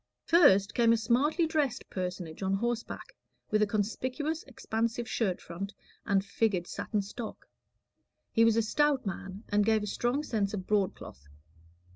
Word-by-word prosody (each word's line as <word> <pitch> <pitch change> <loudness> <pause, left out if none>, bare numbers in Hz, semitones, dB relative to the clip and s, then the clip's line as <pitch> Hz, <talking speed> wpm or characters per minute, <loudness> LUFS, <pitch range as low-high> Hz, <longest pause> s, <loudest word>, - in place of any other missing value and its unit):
First 210 - +5
came 235 -2 +4
a - - +3
smartly 265 +9 +2
dressed 295 -6 -1
personage 180 -3 -4
on 190 0 +1
horseback, 235 +2 -3 0.4
with 215 0 +3
a 210 - +4
conspicuous 255 +9 -2
expansive 230 -1 -2
shirt 195 -8 0
front 195 +5 -7 0.3
and 195 -2 +2
figured 200 -3 0
satin 205 +3 -2
stock. 220 +3 -8 0.8
He 225 - +4
was 230 -1 +5
a 230 - +3
stout 290 +3 +2
man, 195 +1 -5
and 205 -1 +3
gave 220 0 +2
a - - -1
strong 240 +7 -1
sense 210 -7 -1
of 190 -2 -5
broadcloth. 185 - -2
215 Hz, 150 wpm, -30 LUFS, 195-240 Hz, 0.8 s, First